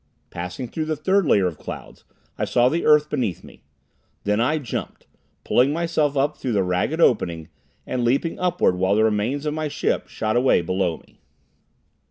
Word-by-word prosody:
Passing 90 +8 -5
through 155 +6 -4
the 155 0 -1
third 190 +4 +1
layer 100 -7 +4
of 85 -4 -3
clouds - - -9 0.3
I - - -3
saw 120 +1 +3
the 165 +4 -1
earth 150 0 +5
beneath 125 - -2
me. - - -15 0.6
Then 105 +2 +1
I 150 +6 +2
jumped, 135 -8 -6 0.4
pulling 130 +3 +3
myself 155 -3 0
up 145 +2 +1
through 125 - -3
the 95 -3 +1
jagged 90 - 0
opening, 85 - +1 0.4
and 125 -1 -2
leaping 135 +7 0
upward 180 - +1
while 95 +2 +2
the 110 - +3
remains 110 +7 0
of 150 - -1
my 155 0 -2
ship 145 - -1
shot 110 +1 -2
away 125 -6 +4
below 90 -1 -1
me. - - -24
125 Hz, 180 wpm, -23 LUFS, 100-150 Hz, 0.6 s, earth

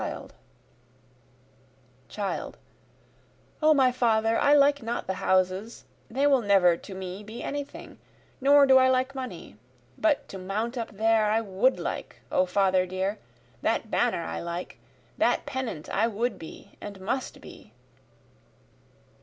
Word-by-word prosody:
Child: - - -4 1.0
O 310 0 +5
my 260 -2 +4
father 225 -2 +2
I 290 +1 +5
like 285 0 +4
not 230 +1 -3
the 190 - -2
houses, 185 +4 0 0.3
They 270 +5 0
will 275 -3 +4
never 195 -5 +4
to 190 +3 -10
me 190 +1 -6
be 215 +3 -8
any 285 0 -3
thing, 280 - -13 0.4
nor 280 +1 +6
do 265 -1 +6
I 260 0 +5
like 260 +1 +1
money, 250 - -7 0.4
But 310 -3 +1
to 195 - -7
mount 215 +6 -3
up 235 -2 -4
there 220 +1 +2
I 215 +2 +2
would 210 +5 +1
like, - - -5 0.2
O 185 - +2
father 185 -1 +2
dear, 190 +3 -2 0.4
that - - -1
banner - - +1
I 80 0 -4
like, 170 +1 -6 0.4
That - - +2
pennant 235 -12 -4
I 220 +3 +1
would 235 +3 -2
be 160 - -11
and 200 -2 -8
must 245 +8 -3
be. - - -14
220 Hz, 140 wpm, -27 LUFS, 190-260 Hz, 1.0 s, nor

